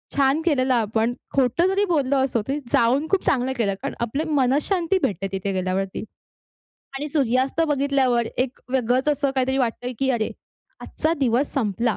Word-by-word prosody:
छान 275 +2 +3
केलेलं 265 -5 +2
आपण. 225 0 +1 0.2
खोटं 270 +7 +3
जरी 395 +2 +2
बोललो 285 -6 +1
असो, 235 -4 -1
तरी 280 +2 -1
जाऊन 260 +6 +3
खूप 390 - +1
चांगलं 260 -1 +1
केलं. 205 -4 +1
कारण - - -3
आपले 240 +7 -1 0.2
मनःशांती 330 +8 +1
भेटते 195 -1 -1
तिथे 195 +1 -2
गेल्यावरती. 185 +1 -2 1.0
आणि 295 - -4
सूर्यास्त 270 +1 +1
बघितल्यावर 270 -4 +2
एक 255 0 -1
वेगळंच 255 +2 +1
असं 285 -1 +1
काहीतरी 265 +1 +1
वाटतंय, 245 0 -1
की 270 0 +1
अरे! 225 -3 0 0.5
आजचा 315 +1 -1
दिवस 255 +2 +1
संपला. 230 -2 0
260 Hz, 155 wpm, -23 LUFS, 235-285 Hz, 1.0 s, छान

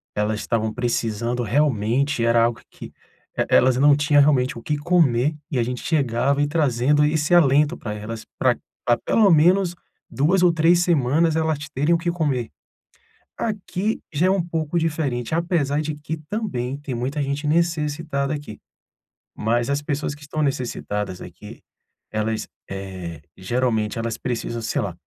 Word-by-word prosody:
elas 105 +1 0
estavam 110 -1 -1
precisando 120 0 -1
realmente, 125 0 +1
era 115 0 +4
algo 115 -1 0
que, - - -11 0.6
elas 130 0 +5
não 145 +2 +6
tinham 145 0 +4
realmente 130 -4 +2
o 115 - -8
que 150 +4 -2
comer, 150 -4 +2 0.2
e 135 - -1
a - - +2
gente 125 +1 -4
chegava 140 -1 +1
e 145 - +2
trazendo 145 -1 +2
esse 155 +2 +1
alento 150 -1 +4
pra 105 -2 -5
elas 110 +1 -6
pra - - +3 0.3
pra 120 -1 +3
pelo 210 -4 +3
menos 175 +3 +4 0.3
2 175 +7 +2
ou 175 -2 +5
3 165 +2 +4
semanas 160 0 +2
elas 160 -1 +1 0.2
terem 150 +6 +2
o - - +2
que 170 +1 -1
comer. 140 -9 -1 0.9
Aqui 210 -1 -2
já 155 +5 +2
é 185 - +3
um 195 - +2
pouco 165 -1 -2
diferente, 150 -6 -1
apesar 160 -4 0
de 155 -1 -4
que 150 +2 -5
também 140 - -2
tem 145 -3 -5
muita 130 +5 -2
gente 140 +1 -2
necessitada 155 -3 0
aqui. 145 -8 -7 0.7
Mas 120 +3 0
as 140 +1 0
pessoas 145 0 -2
que 150 - -15
estão 155 +1 -3
necessitadas 105 -8 -3
aqui, - - -11 0.5
elas, 110 0 -2 0.2
eh, 95 -4 -7 0.2
geralmente 110 +1 -1
elas 115 -1 -3
precisam, 120 -1 -3
sei - - -1
lá, - - -3
140 Hz, 160 wpm, -22 LUFS, 120-160 Hz, 0.9 s, não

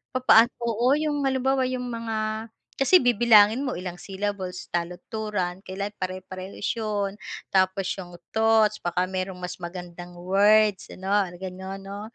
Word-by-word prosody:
Papaano 240 -2 +6
oo, 235 +3 +2
'yong 295 -2 -1
halimbawa 265 0 +1
'yong 255 -1 -3
mga 220 -1 -3 0.3
kasi 275 +7 +6
bibilangin 235 -1 +5
mo 255 - -2
ilang 180 -1 -5
syllables, 195 -2 -4
taludturan, 180 +2 -3
kailangan 200 +2 -5
pare-parehas 185 +1 -5
'yon. 205 -3 -2 0.4
Tapos 190 0 +2
'yong 175 -2 -9 0.2
thoughts, 220 -1 +4
baka 180 +1 0
merong 185 -1 -4
mas 180 0 -5
magandang 175 0 -8
words 205 +2 +3
ano, 190 +1 -5 0.3
gano'n 190 +1 -7
'no? 200 +1 -7
200 Hz, 130 wpm, -25 LUFS, 185-225 Hz, 0.4 s, Papaano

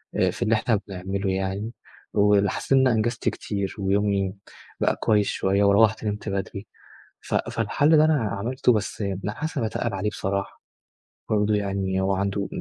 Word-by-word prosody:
آآ - - +2
في - - -10
اللي 110 +1 +3
إحنا 110 -1 +1
بنعمله 95 +1 -3
يعني، 95 +3 -2 0.4
وحسيت 100 +1 +2
إن 135 - +6
أنا - - +3
أنجزت 115 +2 0
كتير 100 -2 -4
ويومي 100 -1 +1 0.5
بقى - - +2
كويس 105 -2 +2
شوية، 100 +1 +1
وروِّحت، 110 +2 +4
نِمت 105 0 -3
بدري. 100 +1 -4 0.5
ف - - -6
فالحل 155 +2 +2
ده 155 - +6
أنا 155 0 +4 0.2
عملته، 125 +5 +1
بس 105 -1 -2 0.2
لأ، 105 - -2
حاسِس 160 +3 -5
إني 115 - 0
باتقِّل 110 -1 -3
عليه 100 +2 -1
بصراحة. 100 -1 -3 0.7
برضه 105 0 +2
يعني 95 -2 -1
هو 95 +1 +1
عنده 100 +1 -1
100 Hz, 160 wpm, -24 LUFS, 100-110 Hz, 0.7 s, إن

